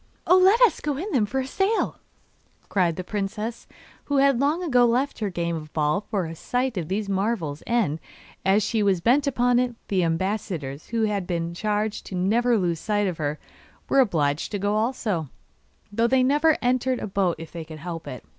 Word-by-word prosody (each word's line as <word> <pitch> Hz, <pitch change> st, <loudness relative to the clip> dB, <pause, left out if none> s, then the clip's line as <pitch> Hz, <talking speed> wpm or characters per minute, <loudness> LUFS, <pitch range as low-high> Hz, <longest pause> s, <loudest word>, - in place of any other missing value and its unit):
'Oh, 365 Hz, -, +6 dB
let 385 Hz, +5 st, +5 dB
us 470 Hz, -9 st, +5 dB
go 290 Hz, -2 st, -2 dB
in 385 Hz, +8 st, -4 dB
them 225 Hz, -, +2 dB
for 265 Hz, +4 st, -1 dB
a -, -, -4 dB
sail!' 390 Hz, +10 st, 0 dB, 0.7 s
cried 175 Hz, -4 st, +1 dB
the 185 Hz, -, -5 dB
princess, 210 Hz, +4 st, -4 dB, 0.4 s
who 285 Hz, -, 0 dB
had 275 Hz, -2 st, +4 dB
long 300 Hz, +6 st, +1 dB
ago 250 Hz, -8 st, +4 dB
left 245 Hz, +4 st, +1 dB
her 210 Hz, -2 st, -1 dB
game 170 Hz, -2 st, -2 dB
of 155 Hz, -1 st, -7 dB
ball 150 Hz, +3 st, +1 dB
for 195 Hz, -4 st, -1 dB
a 165 Hz, -, -6 dB
sight 250 Hz, +8 st, -2 dB
of 170 Hz, -5 st, -3 dB
these 200 Hz, +3 st, -2 dB
marvels, 195 Hz, -7 st, -1 dB
and, 215 Hz, -10 st, +1 dB, 0.4 s
as 195 Hz, +2 st, +3 dB
she 225 Hz, -, 0 dB
was 195 Hz, -3 st, +2 dB
bent 255 Hz, -, +3 dB
upon 245 Hz, -2 st, +2 dB
it, 250 Hz, -1 st, -1 dB
the 190 Hz, -3 st, +2 dB
ambassadors, 165 Hz, -4 st, -2 dB
who 230 Hz, -1 st, -1 dB
had 205 Hz, -4 st, -1 dB
been 170 Hz, -1 st, -2 dB
charged 210 Hz, +3 st, -2 dB
never 225 Hz, +7 st, +2 dB
to 225 Hz, -, +3 dB
lose 170 Hz, -3 st, 0 dB
sight 205 Hz, +2 st, 0 dB
of 180 Hz, -4 st, -2 dB
her, 150 Hz, 0 st, -1 dB, 0.5 s
were 275 Hz, -, +4 dB
obliged 155 Hz, -, +1 dB
to 205 Hz, -, -1 dB
go 205 Hz, +1 st, 0 dB
also, 215 Hz, -, -1 dB, 0.6 s
though 230 Hz, +3 st, +2 dB
they 255 Hz, +1 st, +3 dB
never 295 Hz, +4 st, +3 dB
entered 255 Hz, +1 st, +1 dB
a -, -, -4 dB
boat 190 Hz, -4 st, 0 dB
if 160 Hz, 0 st, -9 dB
they 170 Hz, -1 st, -6 dB
could 155 Hz, 0 st, -10 dB
help 165 Hz, +1 st, -7 dB
it. 125 Hz, -, -8 dB
210 Hz, 200 wpm, -24 LUFS, 170-250 Hz, 0.7 s, Oh